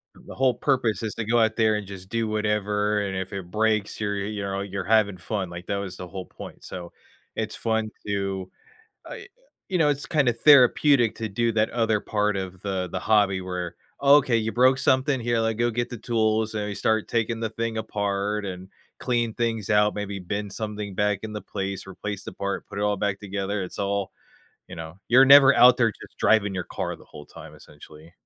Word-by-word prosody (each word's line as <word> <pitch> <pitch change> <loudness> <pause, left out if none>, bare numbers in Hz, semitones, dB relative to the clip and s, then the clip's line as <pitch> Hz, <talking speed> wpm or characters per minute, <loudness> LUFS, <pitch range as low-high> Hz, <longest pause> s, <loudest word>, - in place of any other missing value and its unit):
The - - -12
whole 130 -1 +3
purpose 120 -3 0
is 110 -2 -4
to 115 - -3
go 120 +2 +2
out 110 -1 +2
there 110 -2 +3
and 105 -2 -4
just 95 -2 -9
do 115 0 -1
whatever, 105 -1 0
and 95 -2 -3
if 95 +1 -5
it 95 -3 -6
breaks, 110 0 0
you're 105 -1 -1
you're, 100 0 -3
you 105 -2 -4
know, 100 0 -3
you're 100 0 -4
having 105 -3 +2
fun, 95 0 -4
like, 85 +1 -8
that 100 - -1
was 95 -2 -5
the 90 - -7
whole 95 0 -7
point, - - -11
so, 85 -2 -8 0.4
it's 110 -1 -3
fun 110 -1 -1 0.2
to, 95 -2 -2 0.6
uh - - -6 0.5
you 185 - +1
know, 155 -3 +4
it's 145 -1 -1
kinda 140 -6 +2
therapeutic 130 -2 +5
to 110 -1 -4
do 115 +3 0
that 110 0 +1
other 115 -3 +1
part 105 -1 0
of 95 -1 -5
the 95 -2 -2
the 95 - -3
hobby 100 -2 +2
where, 90 -2 -5 0.3
"Oh, 140 +1 +7
okay, 130 -5 +2
you 110 0 -1
broke 130 +2 +4
something 130 +1 +2
here, 120 0 0
like, 115 -1 0
go 120 +1 +1
get 120 +1 -2
the 120 - -7
tools," 110 -1 0
and 105 -1 -2
we 100 - -4
start 110 0 0
taking 115 0 -1
the 110 -1 -2
thing 115 0 -3
apart 105 -1 -2
and 95 -1 -7 0.3
clean 120 -2 0
things 115 -3 -2
out, 105 0 +3
maybe 100 -1 -4
bend 100 +2 -4
something 105 -2 -5
back 105 0 0
into 105 -1 -5
place, 95 -2 -5
replace 100 +1 -6
the - - -7
part, 100 0 -4
put - - -8
it - - -1
all 105 0 +1
back 100 -1 -1
together. 100 0 -3
It's 90 - -7
all, 100 -1 -1 0.6
you - - -8
know, 80 +2 -8
you're 130 +3 +7
never 140 0 +8
out 125 +1 +7
there 115 -3 +3
just - - -15
driving 105 -3 +3
your 90 - -3
car - - -4
the - - -17
whole 75 - -12
time, - - -12
essentially. 75 +2 -15
105 Hz, 215 wpm, -25 LUFS, 100-115 Hz, 0.6 s, never